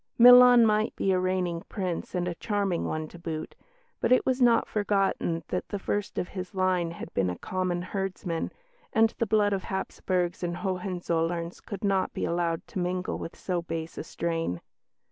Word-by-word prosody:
Milan 245 0 +9
might 215 0 +2
be 195 - +1
a 185 - +3
reigning 180 -2 -1
Prince 185 -3 -3
and 175 0 0
a 175 - -1
charming 200 -1 -1
one 155 0 -3
to 175 - -12
boot, 160 -2 -5 0.5
but - - 0
it 255 - +5
was 260 0 +1
not 235 -2 +5
forgotten 195 -5 0
that 180 - -3
the 205 - -2
first 205 +1 -3
of 180 - -2
his 185 +1 -7
line 185 -2 +1
had 170 - -8
been 95 -2 +1
a 90 - -4
common 185 -1 -2
herdsman, 185 -3 -3 0.4
and 225 0 +3
the 230 - +1
blood 205 -1 +3
of 190 -2 -2
Hapsburgs 185 -2 -2
and 175 -1 -2
Hohenzollerns 175 -3 -2
could 200 -1 -7
not 195 -2 +1
be - - -2
allowed 170 -1 -1
to - - -4
mingle 180 +1 -2
with 165 - -7
so 180 -2 -2
base 165 -1 -5
a - - -5
strain. 165 - -2
185 Hz, 185 wpm, -28 LUFS, 170-200 Hz, 0.5 s, Milan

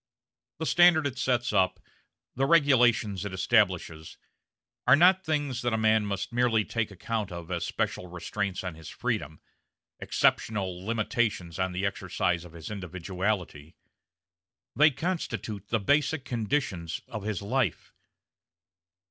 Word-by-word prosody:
The 160 - -3
standard 175 -2 +5
it 130 -3 -3
sets 120 -2 0
up, 95 -1 +2 0.6
the 135 +1 +1
regulations 120 - +4
it 100 -2 -5
establishes, 80 -3 +1 0.7
are 125 - +8
not 185 +4 +5
things 145 -6 -1
that 120 -1 0
a - - +2
man 110 -1 +3
must 100 +3 -3
merely 120 -3 +2
take 115 -2 -2
account 105 +1 -4
of 85 -1 -7
as - - -2
special 90 - -2
restraints 95 +2 -4
on 90 -2 -4
his 80 -1 -11
freedom, 80 +2 -3 0.6
exceptional 95 -4 0
limitations 110 -5 -1
on 95 0 0
the 90 +2 -2
exercise 90 -3 -1
of 85 - -13
his 85 +3 -8
individuality; 90 -3 -4 1.0
they 155 +2 +6
constitute 140 - -4
the 115 - 0
basic 145 +6 +1
conditions 105 - -2
of 110 - -6
his 105 -1 -3
life. 130 +6 -1
105 Hz, 130 wpm, -28 LUFS, 95-125 Hz, 1.0 s, are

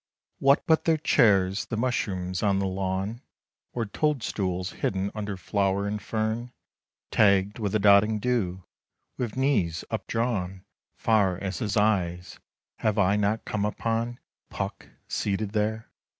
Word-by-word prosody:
What 140 +1 +4
but 160 -1 +3
their 160 -1 +3
chairs 100 -10 +3
the 115 - -4
mushrooms 95 -7 -1
on 100 -2 +2
the 100 - 0
lawn, 95 +4 -2 0.5
Or 120 -2 -2
toadstools 100 - -1
hidden 95 +1 -2
under 105 -2 -4
flower 95 +2 0
and 105 0 -3
fern, 110 +3 -2 0.6
Tagged 100 0 +3
with 105 -2 -2
the - - +4
dotting 105 +1 +5
dew! 100 -6 -1 0.6
With 120 -1 -3
knees 105 - +1
updrawn 100 -6 -2 0.3
Far 100 -5 +2
as 95 -2 -4
his 105 +1 -1
eyes, 90 -5 0 0.4
have 110 -1 0
I 100 0 +3
not 105 +2 0
come 105 -2 -2
upon 115 +3 -1 0.3
PUCK - - -5 0.2
seated 100 0 -1
there? 110 +1 -1
105 Hz, 135 wpm, -27 LUFS, 95-115 Hz, 0.6 s, dotting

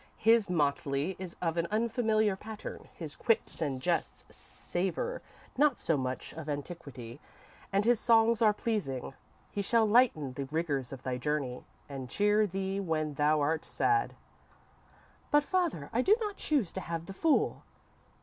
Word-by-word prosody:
His 225 -2 +4
motley 145 0 0
is 185 -2 -7
of 165 -1 0
an 170 0 +1
unfamiliar 220 -2 +1
pattern, 215 +2 -8
his 155 -4 -7
quips 225 -6 0
and 140 -4 -1
jests 130 - -1
savour 190 - -3 0.4
not 290 -4 +4
so 165 - +1
much 130 -2 -3
of 155 -1 -7
antiquity, 145 -5 -6 0.5
and 200 +1 +2
his 240 -1 +4
songs 230 0 +4
are 215 -2 +6
pleasing. 205 - -2 0.4
He 205 - -2
shall 225 +3 +3
lighten 210 - +3
the 140 +1 -4
rigours 140 -3 -2
of 135 -2 -8
thy 125 -1 -2
journey 140 -3 -2 0.2
and 135 -3 -6
cheer 210 - +3
thee 195 +1 -2
when 155 -5 -1
thou 150 +1 +2
art 155 +2 +1
sad."_ 410 -1 +1 1.1
_"But, 295 0 +4
father, 335 - -1
I 240 - +3
do 400 +11 +5
not 420 -3 -3
choose 275 - 0
to 190 - -4
have 165 -1 -4
the 195 - -8
fool." 310 +9 +2
180 Hz, 155 wpm, -31 LUFS, 145-225 Hz, 1.1 s, are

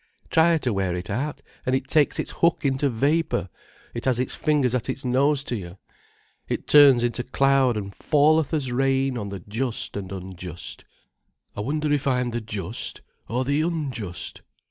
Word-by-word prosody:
Try 165 +1 +5
to 125 -7 -1
wear 95 -3 0
it 90 +4 -5
out, 140 +8 -3 0.2
and 130 - +1
it 130 0 -2
takes 150 0 +3
its - - -3
hook 170 -3 +1
into 135 +1 +2
vapour, 140 - 0 0.4
it 120 - -5
has 130 -3 +2
its 125 0 -2
fingers 145 -5 +1
at 125 0 -1
its 130 +1 -4
nose 140 +3 +2
to 125 - -3
you. 90 -3 -7 0.7
It - - -2
turns 140 -5 +7
into 120 0 0
cloud 135 -2 +2
and 100 -1 -5
falleth 155 0 +3
as 145 -6 -1
rain 135 +1 +1
on 105 -4 -4
the 100 -2 -6
just 115 +5 -3
and 95 -2 -5
unjust. 90 -2 -7 0.7
I 105 - -3
wonder 150 +6 -1
if 145 -1 0
I'm 125 -2 +1
the 120 0 -2
just 105 0 -5 0.3
or 125 +3 0
the 140 +3 +1
unjust." 135 - -3
130 Hz, 175 wpm, -24 LUFS, 110-145 Hz, 0.7 s, turns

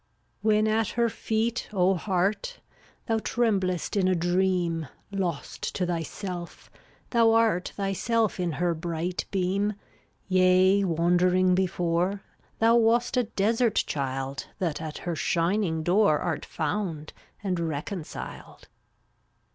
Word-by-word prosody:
322 220 - -3 0.2
When 215 +1 +2
at 225 - 0
her 235 -1 +2
feet, 225 +3 -2
O 190 -2 +3
Heart, 195 - -1 0.5
Thou 225 -1 +1
tremblest 195 -8 0
in 190 -2 +2
a 185 - +3
dream, 175 -2 0 0.2
Lost 190 -4 -3
to 185 - 0
thyself, 175 +1 -5 0.4
thou 230 -2 +4
art 225 -6 +2
Thyself 205 +2 0
in 175 -3 -1
her 175 +2 0
bright 165 +1 -3
beam. 195 +2 0 0.5
Yea, 185 +1 +4
wandering 180 +2 +3
before, 180 +1 0 0.3
Thou 230 +1 +5
wast 235 +2 +3
a 250 -1 +2
desert 225 +2 +1
child 135 -1 -2
That 165 -4 -2
at 155 -1 -5
her 175 -2 -3
shining 170 0 0
door 180 -2 +4
Art 170 -2 -3
found, 160 -2 -3 0.3
and 185 -3 -1
reconciled. 165 +2 -6
185 Hz, 120 wpm, -27 LUFS, 170-210 Hz, 0.5 s, Thou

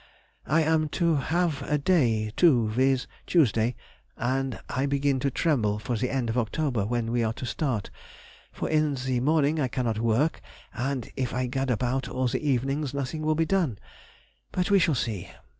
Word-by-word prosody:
I 155 +3 +3
am 155 -1 +2
to 170 -3 +3
have 165 +2 0
a 150 - 0
day 120 -10 +2
too, 125 -11 +4
viz., 130 +3 +2 0.2
Tuesday, 125 -7 +3 0.4
and 130 +2 -1
I 135 +2 -1
begin 140 -1 +1
to 140 - 0
tremble 120 -8 +1
for 120 +3 -3
the 125 +3 -1
end 130 -3 -1
of 115 +2 0
October, 120 -3 -1
when 115 -1 -1
we 120 -1 +1
are 110 0 0
to 130 +2 -6
start, 120 -4 -2 0.6
for - - -4
in 155 -2 +2
the 130 -1 -1
morning 150 +3 +2
I 135 - +1
cannot 120 -3 -1
work, 115 +8 +1 0.3
and 130 -1 -2
if 130 -2 -2
I 125 0 0
gad 135 +2 -2
about 125 +2 0
all 130 0 0
the 120 - -1
evenings 140 0 0
nothing 140 +3 -3
will 155 0 +1
be 165 +1 +2
done. 165 - +1 0.7
But 180 +1 -1
we 200 - +6
shall 170 -4 +2
see! 110 -7 -3
135 Hz, 180 wpm, -27 LUFS, 120-150 Hz, 0.7 s, we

